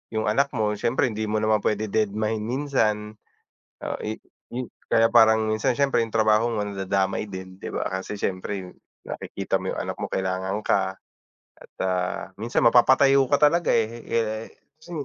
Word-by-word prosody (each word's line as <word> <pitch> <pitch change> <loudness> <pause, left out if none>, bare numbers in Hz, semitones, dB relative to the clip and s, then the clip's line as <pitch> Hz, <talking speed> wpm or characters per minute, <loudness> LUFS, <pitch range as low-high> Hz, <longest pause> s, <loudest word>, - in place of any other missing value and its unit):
yung 110 - 0
anak 140 +7 +1
mo, 105 -1 +1
siyempre 120 0 +1
hindi 110 0 -3
mo 105 - -1
naman 110 0 +3
puwede 105 0 -1
dedmahin 110 +1 0
minsan. 110 -6 -1 0.7
O - - -3
i 110 - -2 0.4
yu 125 -1 -4 0.2
kaya 115 0 +5
parang 110 -2 +5
minsan 110 +3 +1
siyempre, 140 -2 +2
yung 115 - -7
trabaho 110 +1 +4
mo 105 -2 -1
nadadamay 95 0 -1
din, 95 -1 -8
'di - - -6
ba? - - -1
Kasi 95 +2 -4
siyempre, 95 -1 -3 0.3
nakikita - - -3
mo - - -3
yung - - -3
anak - - -4
mo - - -2
kailangan 95 +1 -1
ka 95 -1 +1 0.6
at, - - -17
ah, 90 -1 -1
minsan 115 +3 -1
mapapatayo 135 +3 +5
ka 145 - +5
talaga, 170 +3 +1
eh, 110 -1 +3
he 115 +1 -10
eh, 110 -1 -1 0.3
kasi 165 +2 -14
110 Hz, 170 wpm, -24 LUFS, 100-115 Hz, 0.7 s, kaya